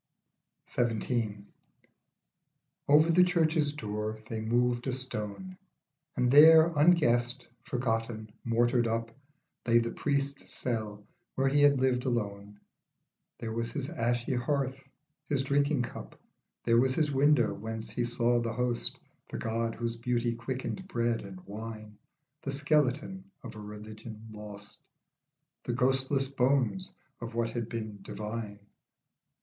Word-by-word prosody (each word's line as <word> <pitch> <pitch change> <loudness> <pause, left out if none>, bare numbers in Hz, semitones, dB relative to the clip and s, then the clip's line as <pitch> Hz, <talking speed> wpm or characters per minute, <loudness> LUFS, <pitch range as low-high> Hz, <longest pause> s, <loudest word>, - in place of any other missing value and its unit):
XVII. 115 -3 -1 1.4
OVER 155 +3 +6
the 180 +2 +6
church's 160 -4 +2
door 105 -4 -4
they 110 -1 -4
moved 120 +2 +1
a - - +1
stone, 130 - -5 0.6
And 125 -1 +2
there, 160 +3 +8
unguessed, 135 -6 +3
forgotten, 115 -3 -2
mortared 120 +1 +2
up, 115 0 -2 0.6
Lay 115 0 +5
the 115 0 +1
priest's 140 -1 -2
cell 110 -4 -3 0.3
where 135 +1 +2
he 145 +1 +3
had 145 -2 +5
lived 130 -1 +1
alone. 105 -4 -3 0.8
There 115 -2 -5
was 115 0 -3
his 145 +1 -3
ashy 120 -5 0
hearth, 135 +1 -1 0.4
his 140 -2 +1
drinking 140 -1 +2
cup, - - -8 0.4
There 115 0 +4
was 130 +1 +2
his 155 -3 +1
window 135 -4 +4
whence 110 +1 -5
he 120 +2 -1
saw 120 0 +2
the 115 -1 -2
host, 125 0 -1 0.3
The - - -5
God 115 0 -2
whose 115 0 -3
beauty 120 0 0
quickened 130 +10 -4
bread 120 -8 0
and 95 -2 -9
wine; 110 0 -8 0.5
The 135 - -3
skeleton 150 +5 0 0.2
of 115 -2 -8
a - - -8
religion 110 +1 -9
lost, 105 -1 -9 0.8
The - - -2
ghostless 135 +1 +1
bones 140 +7 +1 0.3
of 115 0 -7
what 115 -1 0
had 120 -1 -3
been 110 -3 -5
divine. 105 0 -6
120 Hz, 130 wpm, -30 LUFS, 115-135 Hz, 1.4 s, there